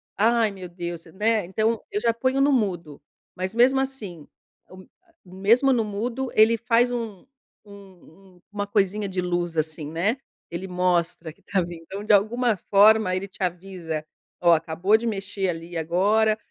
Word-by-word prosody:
Ai 225 Hz, +1 st, +3 dB
meu 185 Hz, -3 st, -9 dB
Deus, 175 Hz, -1 st, -6 dB
né. 210 Hz, +5 st, 0 dB
Então 215 Hz, +4 st, -1 dB
eu 205 Hz, -, -1 dB
já 230 Hz, +1 st, +1 dB
ponho 260 Hz, +3 st, 0 dB
no 280 Hz, +1 st, +4 dB
mudo, 175 Hz, -, -2 dB, 0.3 s
mas 185 Hz, +3 st, -3 dB
mesmo 255 Hz, +3 st, +4 dB
assim, 205 Hz, -, -5 dB, 0.4 s
o 185 Hz, -, -13 dB
m -, -, -25 dB, 0.4 s
mesmo 220 Hz, +9 st, +3 dB
no 230 Hz, -, +1 dB
mudo 230 Hz, +5 st, -3 dB
ele 220 Hz, +2 st, +5 dB
faz 240 Hz, +1 st, +2 dB
um 225 Hz, -6 st, -5 dB, 0.4 s
um 195 Hz, -2 st, -17 dB
um 175 Hz, -, -24 dB
uma 205 Hz, -1 st, -2 dB
coisinha 200 Hz, 0 st, 0 dB
de 185 Hz, -1 st, -3 dB
luz 175 Hz, -2 st, -2 dB
assim, 155 Hz, -1 st, -2 dB
né. 200 Hz, +10 st, 0 dB, 0.3 s
Ele 170 Hz, +3 st, -5 dB
mostra 175 Hz, -3 st, -1 dB
que -, -, -31 dB
está 195 Hz, -, -1 dB
vindo, 170 Hz, -1 st, -7 dB
então 195 Hz, +5 st, -7 dB
de 215 Hz, -, +4 dB
alguma 225 Hz, +3 st, +2 dB
forma 210 Hz, -1 st, +5 dB
ele 195 Hz, +2 st, -3 dB
te 195 Hz, -, -18 dB
avisa: 175 Hz, -3 st, -4 dB, 0.4 s
"Ó, 170 Hz, -, +7 dB
acabou 165 Hz, +6 st, +2 dB
de 235 Hz, +1 st, -4 dB
mexer 195 Hz, -2 st, -3 dB
ali 165 Hz, +1 st, -6 dB
agora" 205 Hz, +7 st, +2 dB
195 Hz, 170 wpm, -24 LUFS, 175-220 Hz, 0.4 s, Ó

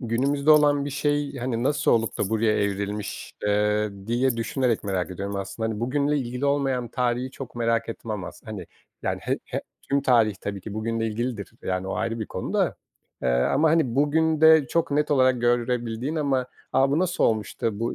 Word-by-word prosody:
günümüzde 140 Hz, +5 st, +1 dB
olan 145 Hz, -2 st, +5 dB
bir 145 Hz, -, -4 dB
şey, 145 Hz, 0 st, -1 dB
hani, 120 Hz, -2 st, -2 dB
nasıl 140 Hz, +1 st, +2 dB
olup 115 Hz, -1 st, +1 dB
da 100 Hz, -, 0 dB
buraya 110 Hz, 0 st, +2 dB
evrilmiş, 100 Hz, +1 st, -3 dB
eee, 105 Hz, +1 st, +2 dB, 0.2 s
diye 120 Hz, +1 st, +1 dB
düşünerek 115 Hz, -1 st, 0 dB
merak 95 Hz, -2 st, -1 dB
ediyorum 100 Hz, +2 st, -4 dB
aslında. 110 Hz, +3 st, -3 dB
Hani, 110 Hz, 0 st, -4 dB
bugünle 145 Hz, +4 st, +1 dB
ilgili 125 Hz, +2 st, -2 dB
olmayan 135 Hz, -4 st, 0 dB
tarihi 125 Hz, +2 st, -1 dB
çok 135 Hz, -3 st, -9 dB
merak 115 Hz, -1 st, 0 dB
etmem 110 Hz, -4 st, -5 dB
as -, -, -10 dB
Hani, 100 Hz, -6 st, -7 dB, 0.4 s
yani, -, -, -1 dB
he -, -, -1 dB
he -, -, -4 dB, 0.2 s
tüm 140 Hz, 0 st, 0 dB
tarih 115 Hz, -6 st, +4 dB
tabii 100 Hz, -1 st, -4 dB
ki 105 Hz, +2 st, -7 dB
bugünle 115 Hz, +1 st, -1 dB
ilgilidir, 115 Hz, -1 st, -3 dB
yani, 95 Hz, 0 st, -2 dB
o -, -, -2 dB
ayrı 115 Hz, 0 st, -2 dB
bir 110 Hz, -, -3 dB
konu -, -, -5 dB
da. -, -, +1 dB, 0.5 s
Eee, 65 Hz, -, +1 dB
ama, 100 Hz, -, +3 dB
hani, 155 Hz, -8 st, +2 dB
bugünde 160 Hz, +1 st, +4 dB
çok 165 Hz, -3 st, 0 dB
net 150 Hz, +1 st, +1 dB
olarak 130 Hz, -3 st, +3 dB
görebildiğin 120 Hz, +3 st, 0 dB
ama 135 Hz, -4 st, +1 dB, 0.3 s
"A! 135 Hz, +1 st, +3 dB
Bu 145 Hz, -, +2 dB
nasıl 180 Hz, 0 st, +1 dB
olmuş 110 Hz, -2 st, 0 dB
da, 105 Hz, -3 st, -1 dB
bu 115 Hz, -, -1 dB
120 Hz, 185 wpm, -25 LUFS, 110-140 Hz, 0.5 s, olan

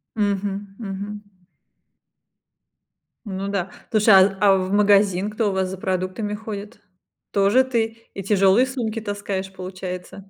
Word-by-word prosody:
Мгм, 200 Hz, -1 st, -2 dB
мгм. 200 Hz, -1 st, -5 dB, 2.1 s
Ну 195 Hz, 0 st, -4 dB
да, 195 Hz, -2 st, -2 dB, 0.2 s
слушай, 215 Hz, -1 st, +4 dB
а 190 Hz, 0 st, +6 dB
а 195 Hz, -2 st, +5 dB
в 185 Hz, 0 st, -2 dB
магазин 205 Hz, -1 st, +3 dB
кто 215 Hz, 0 st, 0 dB
у -, -, -4 dB
вас 190 Hz, -1 st, 0 dB
за 190 Hz, -, -6 dB
продуктами 190 Hz, +3 st, -2 dB
ходит? 210 Hz, +1 st, -7 dB, 0.5 s
Тоже 200 Hz, +6 st, +4 dB
ты? 230 Hz, -2 st, -3 dB
И 195 Hz, -, -5 dB
тяжёлые 195 Hz, +4 st, +4 dB
сумки 230 Hz, -4 st, -3 dB
таскаешь, 200 Hz, -2 st, -4 dB
получается? 185 Hz, +1 st, -7 dB
200 Hz, 130 wpm, -22 LUFS, 190-210 Hz, 2.1 s, а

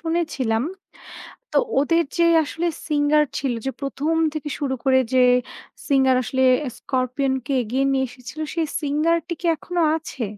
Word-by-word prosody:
শুনেছিলাম। 305 Hz, -9 st, -1 dB, 0.9 s
তো -, -, +1 dB, 0.2 s
ওদের 330 Hz, +4 st, +2 dB
যে 340 Hz, -, +4 dB, 0.2 s
আসলে 330 Hz, +3 st, -3 dB, 0.2 s
singer 300 Hz, 0 st, +3 dB
ছিল 265 Hz, -3 st, -1 dB
যে 270 Hz, -, 0 dB
১ম 280 Hz, +3 st, -1 dB, 0.2 s
থেকে 305 Hz, -1 st, -4 dB
শুরু 275 Hz, -3 st, -1 dB
করে 260 Hz, -1 st, +4 dB
যে 255 Hz, -1 st, +5 dB, 0.6 s
singer 265 Hz, -2 st, +4 dB
আসলে 260 Hz, +3 st, 0 dB, 0.3 s
'Scorpion' 260 Hz, +1 st, -1 dB
কে 275 Hz, -, -2 dB
এগিয়ে 255 Hz, +5 st, 0 dB
নিয়ে 265 Hz, -1 st, +1 dB
এসেছিল 250 Hz, +5 st, -11 dB
সেই 330 Hz, -1 st, 0 dB
singer 305 Hz, +3 st, +1 dB
টি 350 Hz, -, -2 dB
কি -, -, -5 dB
এখনো 350 Hz, +2 st, -3 dB
আছে? 300 Hz, -6 st, -5 dB
280 Hz, 150 wpm, -22 LUFS, 260-320 Hz, 0.9 s, যে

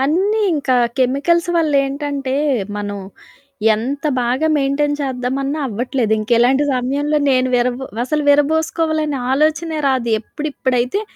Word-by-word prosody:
అన్నీ 375 Hz, +11 st, +1 dB, 0.2 s
ఇంకా 275 Hz, -4 st, 0 dB, 0.2 s
కెమికల్స్ 295 Hz, +7 st, +1 dB
వల్లేంటంటే, 280 Hz, -3 st, 0 dB, 0.4 s
మనం 205 Hz, -1 st, -4 dB, 0.8 s
ఎంత 270 Hz, +7 st, -4 dB, 0.2 s
బాగా 255 Hz, +6 st, 0 dB
మెయిన్‌టైన్ 285 Hz, +1 st, 0 dB
చేద్దామన్నా 270 Hz, +2 st, -2 dB
అవ్వట్లేదు. 240 Hz, 0 st, -1 dB
ఇంకిలాంటి 240 Hz, +5 st, +3 dB
సమయంలో 280 Hz, +4 st, 0 dB
నేను 255 Hz, 0 st, +2 dB
విరబు 245 Hz, +2 st, -1 dB, 0.2 s
అసలు 300 Hz, +3 st, -1 dB
విరబోసుకోవాలనే 310 Hz, 0 st, +1 dB
ఆలోచనే 310 Hz, +3 st, +1 dB
రాదు. 255 Hz, -3 st, 0 dB
ఎప్పుడిప్పుడైతే 260 Hz, -, -2 dB
275 Hz, 100 wpm, -18 LUFS, 250-305 Hz, 0.8 s, ఇంకిలాంటి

